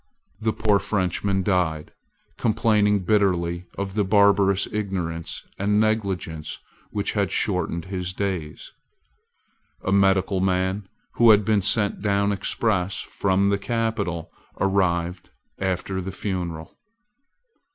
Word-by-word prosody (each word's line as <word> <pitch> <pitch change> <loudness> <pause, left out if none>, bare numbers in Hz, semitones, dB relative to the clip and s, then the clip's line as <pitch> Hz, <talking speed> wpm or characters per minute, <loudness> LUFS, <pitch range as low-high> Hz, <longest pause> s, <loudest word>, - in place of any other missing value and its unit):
The 110 0 0
poor 105 -2 +2
Frenchman 95 0 -1
died, 90 -5 0 0.4
complaining 105 -3 +2
bitterly 90 -4 +1
of 100 -1 -3
the 105 0 +1
barbarous 100 -1 +4
ignorance 90 -6 -3
and 105 +2 +2
negligence 100 -8 -1 0.3
which 105 -1 -1
had 100 -3 0
shortened 85 -4 0
his 90 -1 -4
days. 90 -5 -4 1.1
A 95 - 0
medical 95 -1 +3
man, 95 +1 0 0.3
who 120 -1 +6
had 105 -2 +6
been 105 -1 +3
sent 100 +1 +2
down 100 0 +1
express 95 -2 -1
from 100 0 +1
the 100 - +1
capital, 105 -7 -2 0.3
arrived 90 -2 0 0.3
after 95 0 -2
the 95 +1 -5
funeral. 90 -4 -5
95 Hz, 110 wpm, -24 LUFS, 90-105 Hz, 1.1 s, who